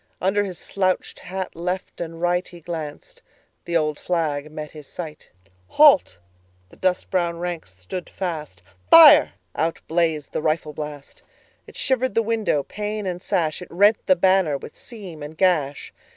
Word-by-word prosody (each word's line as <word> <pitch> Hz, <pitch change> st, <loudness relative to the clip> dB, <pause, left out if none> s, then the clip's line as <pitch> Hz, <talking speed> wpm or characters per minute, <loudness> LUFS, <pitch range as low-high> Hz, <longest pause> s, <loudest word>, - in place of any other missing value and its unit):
Under 195 Hz, +2 st, +1 dB
his 185 Hz, -4 st, -5 dB
slouched 185 Hz, 0 st, -1 dB
hat 190 Hz, 0 st, -6 dB
left 180 Hz, +2 st, -4 dB
and 165 Hz, -1 st, -5 dB
rightHe 175 Hz, -1 st, -2 dB
glanced: 160 Hz, -4 st, -7 dB, 0.4 s
the 170 Hz, 0 st, +1 dB
old 150 Hz, -2 st, -1 dB
flag 155 Hz, -4 st, -2 dB
met 155 Hz, -1 st, -7 dB
his 150 Hz, -3 st, -12 dB
sight."Halt!"—the 95 Hz, -, +1 dB, 0.6 s
dust 185 Hz, -1 st, -1 dB
brown 170 Hz, -3 st, 0 dB
ranks 170 Hz, -, -5 dB
stood 165 Hz, -, -7 dB
fast,"Fire!"—out 155 Hz, -, +3 dB
blazed 160 Hz, -3 st, 0 dB
the -, -, -2 dB
rifle 155 Hz, -1 st, -1 dB
blast.It 150 Hz, -2 st, -11 dB
shivered 260 Hz, -1 st, 0 dB
the 230 Hz, -, +3 dB
window, 220 Hz, -10 st, 0 dB
pane 210 Hz, +3 st, -4 dB
and 180 Hz, -1 st, -3 dB
sash; 160 Hz, -2 st, -1 dB
It 180 Hz, -, -9 dB
rent 205 Hz, +5 st, +4 dB
the 185 Hz, -, +6 dB
banner 185 Hz, -4 st, +3 dB
with 140 Hz, -, -11 dB
seam 195 Hz, -, -11 dB
and 150 Hz, +2 st, -8 dB
gash. 155 Hz, -7 st, +1 dB
170 Hz, 135 wpm, -23 LUFS, 150-185 Hz, 0.6 s, the